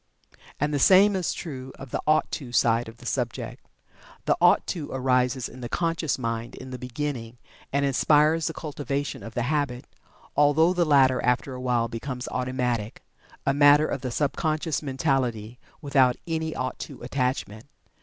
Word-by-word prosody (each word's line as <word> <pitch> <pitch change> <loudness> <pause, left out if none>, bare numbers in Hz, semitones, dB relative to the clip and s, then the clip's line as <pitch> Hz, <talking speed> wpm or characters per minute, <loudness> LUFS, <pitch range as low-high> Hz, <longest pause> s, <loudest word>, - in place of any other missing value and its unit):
And 150 +1 0
the 145 - +1
same 195 +6 +6
is 185 -3 0
true 130 -5 -6
of 135 -2 -10
the - - -2
"ought 155 0 +3
to" 130 -5 -5
side 120 -1 +2
of 115 - -14
the 120 - -15
subject. 120 -3 -3 0.6
The - - +3
"ought - - +5
to" 155 -5 -4
arises 125 -1 +1
in 125 - -12
the 120 - -5
conscious 165 -2 -1
mind 115 -2 -4
in 130 0 -9
the 125 - -6
beginning, 125 -2 -5 0.3
and 140 +1 +1
inspires 150 +4 +3
the 160 - -3
cultivation 145 -2 -4
of 115 +2 -9
the 120 - 0
habit, 135 -2 -1 0.5
although 150 +4 +4
the 175 -1 +2
latter 135 -4 +4
after 125 +2 0
a 125 - -7
while 120 -2 +1
becomes 125 +2 -5
automatic, 125 -4 -2 0.4
a 135 - +2
matter 145 +1 +6
of 140 - -3
the 130 - -3
sub 140 +3 -1
conscious 155 -1 -1
mentality, 130 -5 -1 0.2
without 135 -3 +3
any 160 -1 -2
"ought 130 0 -3
to" - - -8
attachment. 125 -4 -2
130 Hz, 170 wpm, -26 LUFS, 125-150 Hz, 0.6 s, same